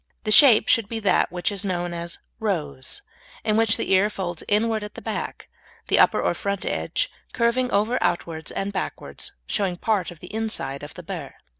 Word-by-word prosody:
The 215 - -1
shape 245 -2 +8
should 225 -3 +3
be 225 - -3
that 195 -3 +3
which 180 +3 -1
is 200 -1 -2
known 175 -2 -2
as 170 0 -4 0.2
"rose," 160 - -2 0.4
in 215 - +2
which 225 -1 +4
the - - -2
ear 190 +2 +5
folds 175 -5 -4
inward 220 +1 +2
at 210 - -8
the - - -6
back, - - -4 0.4
the - - +4
upper - - +5
or - - +1
front 200 -2 -3
edge - - 0 0.3
curving 250 +1 +2
over 215 +3 +2
outwards 165 -2 -1
and 200 +1 -3
backwards, 190 - -4
showing 190 -4 -1
part 200 -5 0
of 175 - -10
the 180 +4 -11
inside 215 -11 -3
of 145 - -9
the 180 - -9
burr. 165 -5 -6
200 Hz, 190 wpm, -24 LUFS, 175-220 Hz, 0.4 s, shape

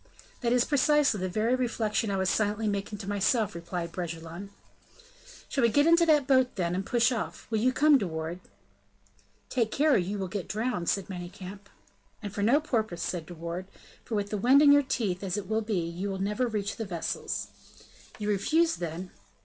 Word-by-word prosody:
"That 235 -2 0
is 245 0 +4
precisely 290 -5 +3
the 185 0 -2
very 220 +6 +1
reflection 230 -3 0
I 195 - 0
was 190 0 0
silently 210 +2 +1
making 200 +1 -2
to 195 -1 -8
myself," 205 +2 +1
replied 170 0 -5
Bragelonne. 170 +2 -6 1.0
"Shall 275 - -1
we 235 - +5
get 285 +6 +3
into 335 +1 +5
that 300 -3 +4
boat, 260 -2 +3
then, 175 -3 -1
and 190 +2 -1
push 240 +3 +2
off? 230 -3 -4
Will 220 - +1
you 255 +4 +3
come, 290 +1 +5
De 195 - -2
Wardes?" 160 +2 -5 1.1
"Take 235 -4 +1
care, 295 +5 +3
or - - +5
you 190 +3 -2
will 190 -1 -3
get 195 -1 -5
drowned," 215 -5 -1
said 195 -2 0
Manicamp. 190 +2 -8 0.5
"And 205 -2 -5
for 205 - -3
no 240 +8 +4
purpose," 220 - -2
said 170 -4 -3
De 175 - -9
Wardes, 170 +3 -6 0.3
"for 225 - -4
with 205 -1 -2
the 210 - -1
wind 265 +7 +6
in 285 - +8
your 285 0 +7
teeth, 215 -9 -2
as 190 0 -2
it 200 -2 -4
will 220 +1 0
be, 210 -4 -1
you 180 +4 -4
will 195 - -3
never 210 +6 0
reach 210 -3 -3
the 225 - -3
vessels." 175 -4 -3 0.7
"You 210 - -4
refuse, 315 - +2
then?" 175 +2 -5
205 Hz, 200 wpm, -28 LUFS, 185-245 Hz, 1.1 s, in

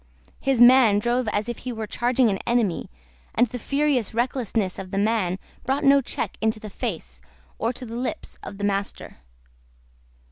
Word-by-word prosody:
His 270 -3 +1
man 240 -4 +7
drove 240 +3 0
as 210 +1 -1
if 240 - -4
he 250 - -5
were 220 -2 -4
charging 245 +3 +2
an 195 - -2
enemy, 235 -7 +1 0.5
and 240 - +5
the 245 +1 -7
furious 275 -4 0
recklessness 230 -5 -1
of 190 -1 -7
the 195 - -3
man 200 -3 +1 0.3
brought 275 +3 0
no 280 0 +6
check - - -4
into 220 0 +1
the 215 -1 -9
face, 165 - -5 0.4
or 230 - +1
to 250 - -8
the 230 0 -7
lips, 245 +1 -4
of 200 - -8
the 205 - -6
master. 200 0 -2
230 Hz, 175 wpm, -24 LUFS, 205-250 Hz, 0.5 s, man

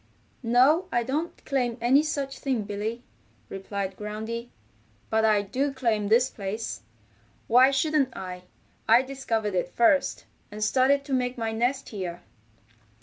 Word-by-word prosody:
"No, 260 +9 +4
I 240 - +1
don't 300 +8 -4
claim 250 -4 -1
any 250 +5 +4
such 280 -3 -3
thing, 260 -6 -1
Billy," 210 +4 -4 0.5
replied 195 0 -4
Groundy. 220 +3 -5 0.6
"But 220 0 +3
I 210 -2 +3
do 265 +8 -1
claim 230 -6 0
this 235 +4 +4
place. 210 +1 -5 0.6
Why 255 +3 +6
shouldn't 275 -1 +1
I? 180 -1 -7 0.4
I 235 +3 +7
discovered 230 -6 -2
it 180 -1 -1
first, 275 - +2 0.3
and 210 +1 -4
started 265 +5 +3
to 280 - -4
make 250 -1 0
my 225 -1 -2
nest 245 +5 -1
here." 175 -4 -6
235 Hz, 140 wpm, -26 LUFS, 210-265 Hz, 0.6 s, I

